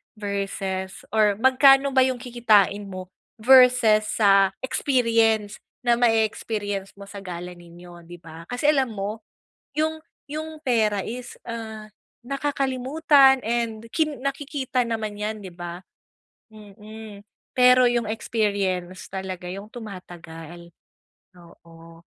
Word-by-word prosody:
versus 195 -2 -4
or 210 -2 +3
magkano 270 +2 +5
ba 260 -1 +4
yung 260 -1 -2
kikitain 215 -5 +2
mo 185 -1 -8 0.3
versus 250 -3 +6
sa 195 -3 +3
experience 230 -5 +1 0.2
na 240 -1 +2
ma-e-experience 215 -3 -1
mo 200 0 -13
sa 200 - -9
gala 180 0 -7
ninyo, 175 0 -14
'di 175 0 -12
ba? 165 0 -12
Kasi 245 - 0
alam 265 -6 +1
mo, 205 +2 -4 0.6
yung 315 +1 -1 0.2
yung 310 +2 -6
pera 215 -6 +1
is, 245 +2 -7
ah, 220 -2 -7 0.4
nakakalimutan 275 0 +2
and 230 -1 -2
ki 315 -1 +1
nakikita 275 -1 -2
naman 215 -2 -4
'yan, 215 +1 -3
'di 185 - -8
ba? 175 +1 -8 0.7
Mm, 210 0 -12 0.3
pero 250 0 +6
yung 240 -2 0
experience 200 -5 -2
talaga 190 -2 -6
yung 195 +3 -7
tumatagal. 175 -6 -10 0.6
Oo. 165 -1 -17
215 Hz, 115 wpm, -24 LUFS, 190-250 Hz, 0.7 s, versus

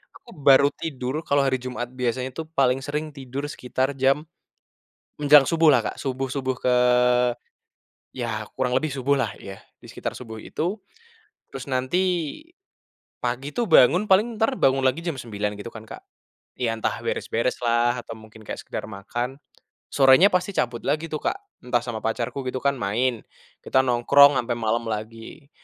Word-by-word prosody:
aku - - -16
baru 140 0 +6
tidur, 135 -3 -3
kalau 140 0 +3
hari 130 -1 +1
Jumat 125 -1 -5
biasanya 125 0 -2
tuh 160 +4 -7
paling 130 -1 +3
sering 150 +3 -4
tidur 135 -1 -7
sekitar 130 +1 -2
jam, 135 +3 +2 0.9
menjelang 145 -2 +6
subuh 165 -2 +5
lah 125 - +4
Kak, - - -4
subuh-subuh 130 0 -3
ke 125 - +2 1.4
ya 115 -4 -4
kurang 125 0 0
lebih 155 0 -2
subuhlah, 135 0 0
ya, 95 0 -9 0.2
di - - -13
sekitar - - -5
subuh 110 -3 -9
itu. 175 - -3 0.7
Terus 135 -1 -7
nanti, 130 +7 0 1.2
pagi 125 +4 -3
tuh 235 -4 -1
bangun 175 +7 +5
paling 210 +5 +4
entar 235 +4 +1
bangun 135 0 +3
lagi 130 +6 0
jam 170 - -1
9.00 105 -5 -4
gitu 115 - -7
kan, 110 -1 -11
Kak. - - -10 0.6
Ya, 115 -2 0
entah 110 - 0 0.2
beres-bereslah, 120 +1 0
atau 115 - -9
mungkin 110 0 -15
kayak - - -6
sekedar - - -5
makan, 120 +6 -5 0.6
sorenya 135 +8 +6
pasti 180 +2 +1
cabut 120 -1 -1
lagi 150 +3 0
tuh, 155 - -3
Kak, - - 0 0.3
entah 125 -1 +1
sama 115 -3 -5
pacarku 120 +4 -2
gitu 130 - -2
kan, 140 0 +3
main 120 +3 0 0.4
kita 130 - +2
nongkrong 140 +4 +6
sampai 120 -1 -2
malem 115 +1 -1
lagi. 115 +6 -7
130 Hz, 155 wpm, -24 LUFS, 120-140 Hz, 1.4 s, baru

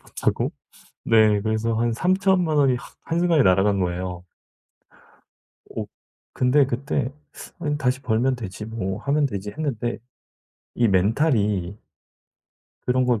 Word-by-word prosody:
못하고 - - -2 0.5
네 110 -2 +4
그래서 110 +2 -1
한 115 +1 +1
30,000,000 185 - +2
원이 135 -3 +4
확 130 - -12
한순간에 165 -3 +2
날아간 95 +1 +3
거예요. 90 0 -3 1.4
오 - - -5 0.5
근데 130 +3 +3
그때 135 +1 -2 0.5
'아니 150 -1 -1
다시 130 -1 0
벌면 125 +2 +1
되지 105 -3 -7
뭐 105 -4 -4
하면 145 +1 +2
되지.' 100 -3 -5
했는데 120 -5 -3 0.8
이 120 -1 +2
멘탈이 100 - +1 1.1
그런 125 0 +2
걸 120 -4 +1
120 Hz, 225 characters per minute, -23 LUFS, 105-140 Hz, 1.4 s, 네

